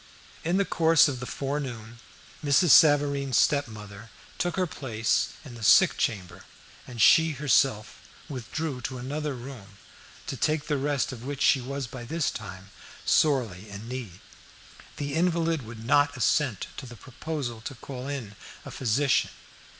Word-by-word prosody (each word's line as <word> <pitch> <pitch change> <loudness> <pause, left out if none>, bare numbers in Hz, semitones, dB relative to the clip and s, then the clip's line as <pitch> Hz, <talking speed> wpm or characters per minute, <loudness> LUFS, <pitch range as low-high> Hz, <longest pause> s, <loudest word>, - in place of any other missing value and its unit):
In 170 +3 +1
the 200 - +2
course 165 -2 +4
of 135 -3 -3
the 125 - -6
forenoon 125 -5 -5 0.4
Mrs. 150 +4 +3
Savareen's 140 -3 +5
stepmother 110 -6 -1 0.3
took 175 +1 -1
her 185 - +1
place 115 -9 -1
in 130 - -10
the 115 - -11
sick 100 - +6
chamber, 90 -4 -3 0.4
and 120 -2 -9
she 160 +8 +6
herself 135 -6 +1 0.3
withdrew 135 +1 -5
to 130 +1 -5
another 145 +3 -4
room 120 -6 -10 0.5
to - - -4
take 150 +3 0
the 150 -2 -1
rest 140 -1 0
of 120 -3 -9
which 140 +1 -3
she 135 - +4
was 140 +2 -4
by 120 0 -9
this 155 +4 -1
time 95 -3 -9 0.3
sorely 115 - +1
in 100 +2 -9
need. 120 -8 -7 0.8
The 145 -1 -4
invalid 165 -1 +1
would 115 -1 -10
not 145 +2 +3
assent 125 -4 +1
to 130 - -7
the 120 - -10
proposal 130 -2 -6
to 135 +4 -7
call 130 +2 -8
in 130 -8 -5 0.3
a - - -8
physician. 135 +3 +1
135 Hz, 150 wpm, -27 LUFS, 115-145 Hz, 0.8 s, sick